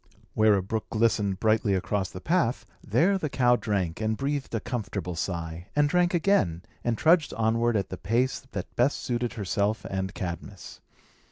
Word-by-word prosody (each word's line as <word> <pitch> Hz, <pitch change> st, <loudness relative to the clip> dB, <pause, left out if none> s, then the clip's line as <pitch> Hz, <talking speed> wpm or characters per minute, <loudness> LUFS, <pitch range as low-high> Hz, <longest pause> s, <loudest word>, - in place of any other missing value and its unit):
Where 110 Hz, -1 st, +5 dB
a 95 Hz, -, 0 dB
brook 110 Hz, +3 st, -3 dB
glistened 110 Hz, -4 st, +1 dB
brightly 110 Hz, -2 st, +2 dB
across 95 Hz, 0 st, -1 dB
the 90 Hz, -, -8 dB
path, 130 Hz, -, 0 dB, 0.2 s
there 175 Hz, -, +2 dB
the 155 Hz, -, -2 dB
cow 125 Hz, -2 st, +3 dB
drank, 100 Hz, -6 st, -2 dB
and 110 Hz, 0 st, 0 dB
breathed 140 Hz, -2 st, -2 dB
a -, -, +1 dB
comfortable 100 Hz, -7 st, -4 dB
sigh, 85 Hz, 0 st, -4 dB
and 145 Hz, 0 st, +4 dB
drank 175 Hz, +3 st, +2 dB
again, 130 Hz, -, +2 dB, 0.2 s
and 120 Hz, -2 st, 0 dB
trudged 160 Hz, +2 st, +3 dB
onward 115 Hz, +1 st, +2 dB
at 95 Hz, -2 st, -2 dB
the 95 Hz, -, -5 dB
pace 120 Hz, +7 st, 0 dB
that 95 Hz, -2 st, -5 dB
best 125 Hz, +4 st, +2 dB
suited 120 Hz, -1 st, -2 dB
herself 100 Hz, 0 st, -1 dB
and 95 Hz, 0 st, -3 dB
Cadmus. 90 Hz, +2 st, -6 dB
110 Hz, 170 wpm, -27 LUFS, 95-125 Hz, 0.2 s, Where